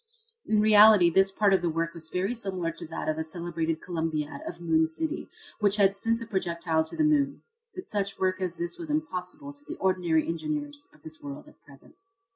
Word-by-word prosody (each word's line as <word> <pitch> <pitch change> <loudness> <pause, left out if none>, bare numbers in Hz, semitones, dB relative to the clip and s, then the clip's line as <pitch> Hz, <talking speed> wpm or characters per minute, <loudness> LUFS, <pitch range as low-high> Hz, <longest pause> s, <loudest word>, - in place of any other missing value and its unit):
In 215 -1 +3
reality 210 -4 +7
this 195 +3 +4
part 200 0 +3
of 190 - +3
the 175 - 0
work 165 +1 -2
was 160 -1 -7
very 190 +5 -1
similar 190 -7 -3
to 165 - -8
that 160 - -5
of 155 0 0
the 160 - -1
celebrated 165 -1 -3
Columbiad, 160 - -3
of 330 - -7
Moon 160 -2 +2
City, 315 - -3 0.3
which 205 -2 +3
had 200 -2 +4
sent 225 +3 +1
the 230 - -7
projectile 170 -6 0
to 160 - -7
the 315 - +3
moon. 290 -2 +2 0.3
But 370 - -7
such 200 -1 -1
work 185 0 0
as 180 -2 -3
this 170 - -3
is 330 -2 -6
impossible 285 -1 -3
to 285 0 -14
the - - -7
ordinary 175 -4 +1
engineers 290 - -4
of - - -24
this 160 0 -8
world 140 0 -8
at - - -19
present. 140 -2 -18
185 Hz, 210 wpm, -27 LUFS, 165-220 Hz, 0.3 s, reality